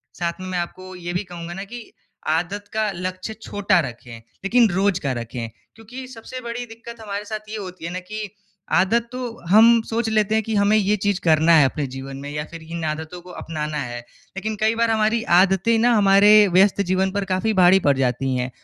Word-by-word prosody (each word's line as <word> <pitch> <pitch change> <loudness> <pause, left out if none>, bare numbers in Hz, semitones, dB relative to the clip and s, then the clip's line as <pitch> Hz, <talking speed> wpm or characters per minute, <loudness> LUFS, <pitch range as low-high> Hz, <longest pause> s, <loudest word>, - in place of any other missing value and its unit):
साथ 170 -1 -2
में 185 - -6
मैं 185 - -2
आपको 185 +2 -7
ये 175 -1 -6
भी 180 - -1
कहूँगा 175 -2 -8
ना 195 +2 -6
कि 235 +4 -9 0.5
आदत 175 +6 -1
का 215 -1 0
लक्ष्य 185 +4 -5
छोटा 200 -3 +1
रखें, 120 0 -12 0.3
लेकिन 230 +3 +4
रोज़ 190 0 +1
का 140 - -1
रखें। 120 -1 -5 0.3
क्योंकि 245 +4 -10
सबसे 255 +1 -9
बड़ी 235 0 -5
दिक्कत 230 0 -11
हमारे 205 -1 -5
साथ 215 0 -7
ये 220 - -5
होती 185 -4 -8
है 170 - -4
ना 185 - -3
कि, 210 +3 -6 0.4
आदत 225 +5 +2
तो 250 - -6 0.3
हम 225 +3 +7
सोच 230 0 -2
लेते 215 -1 +1
हैं 220 - +1
कि 225 - -4
हमें 200 +1 +3
ये 205 0 +2
चीज़ 200 -1 0
करना 160 0 +4
है 150 - +6
अपने 140 +2 -1
जीवन 135 0 -7
में 140 +1 -7
या 150 +1 -3
फ़िर 165 -1 -9
इन 165 +1 -6
आदतों 160 +3 -7
को 180 - -15
अपनाना 155 -1 -4
है। 120 -4 -4 0.4
लेकिन 215 +2 -3
कई 220 +1 +2
बार 230 0 +1
हमारी 220 +1 +1 0.2
आदतें 195 +4 +3
ना 240 +2 +4
हमारे 205 +1 +6
व्यस्त 195 +2 +4
जीवन 190 0 0
पर 200 0 -2
काफ़ी 205 +4 +1
भारी 180 +1 +6
पड़ 145 -6 +2
जाती 130 0 0
हैं 125 0 -2
195 Hz, 210 wpm, -22 LUFS, 170-215 Hz, 0.5 s, हम